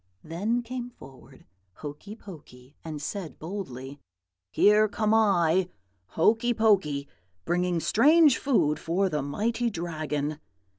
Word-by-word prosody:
Then 210 +9 -2
came 245 0 -6
forward 135 - -16 0.3
Hokey 150 - -9
Pokey, 145 - -14
and 155 -2 -6
said 180 +2 -6
boldly, 145 -7 -7 0.5
"'Here 210 - +4
come 215 +1 0
I, 185 -5 +3 0.5
Hokey 230 +7 +3
Pokey, 185 -11 +2 0.4
bringing 180 0 0
strange 295 - +4
food 155 - +1
for 185 +4 0
the 150 -4 -1
mighty 225 - -1
Dragon.' 155 -5 -3
180 Hz, 110 wpm, -27 LUFS, 150-220 Hz, 0.5 s, Here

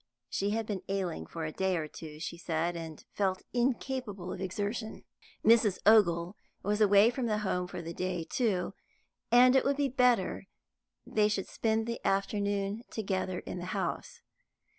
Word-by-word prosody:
She 200 - 0
had 225 +1 -1
been 205 -3 -3
ailing 190 -4 -2
for 165 -1 -5
a 155 - -3
day 190 +2 0
or 155 -2 -3
two, 150 0 -10
she 165 +1 -4
said, 170 0 -1
and 160 -2 -7
felt 190 -2 0
incapable 245 -6 -1
of 190 - -7
exertion; 205 +4 -3 0.4
Mrs. 220 -4 +5
Ogle 180 -4 +5 0.3
was 210 +2 0
away 205 +2 +6
from 245 -1 -2
home 210 -4 0
for 175 - -6
the 165 +1 -5
day, 180 -1 -2
too, 200 -6 0 0.6
and 250 +2 +7
it 265 - +5
would 275 0 +1
be 285 -1 +1
better 245 -7 +2 0.6
they 210 -1 +2
should 205 -2 -1
spend 220 0 0
the 235 0 -4
afternoon 200 +2 0
together 190 -3 -2
in - - -6
the 175 - -5
house. 480 -1 -4
200 Hz, 160 wpm, -31 LUFS, 180-225 Hz, 0.6 s, and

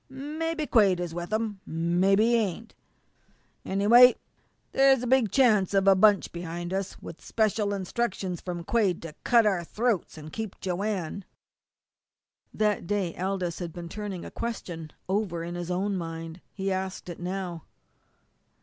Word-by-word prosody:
Mebby 305 +4 -3
Quade 200 -9 +4
is 175 -2 -4
with 175 +3 -5
him, 215 -2 -1
an' 170 +2 -1
mebby 195 +3 +4
he 235 +1 +3
ain't. 225 0 -2 0.9
Anyway, 235 +6 +6 0.6
there's 270 -2 +4
a - - -1
big 250 -3 +3
chance 210 -6 +3
of 195 0 +3
a 195 - +9
bunch 205 +1 +4
behind 175 +1 -5
us 195 0 -3
with 165 - -9
special 215 -2 0
instructions 190 -2 -2
from 175 -2 -5
Quade 200 -3 +1
to 165 -2 -7
cut 235 -2 +5
our 190 -5 +1
throats 215 -2 -1
and 155 0 -10
keep 220 -3 -5
Joanne." 190 -1 -3 1.3
That 210 -5 0
day 195 -4 -1
Aldous 185 -2 -2
had 175 -2 -4
been 170 -1 -7
turning 200 -3 -5
a - - -8
question 175 -9 -5 0.2
over 190 -4 -1
in 170 +1 -5
his 175 0 -5
own 195 +3 0
mind. 165 -1 -6
He 195 0 -3
asked 190 0 -3
it 175 - -7
now. 180 -2 -4
195 Hz, 155 wpm, -27 LUFS, 175-215 Hz, 1.3 s, a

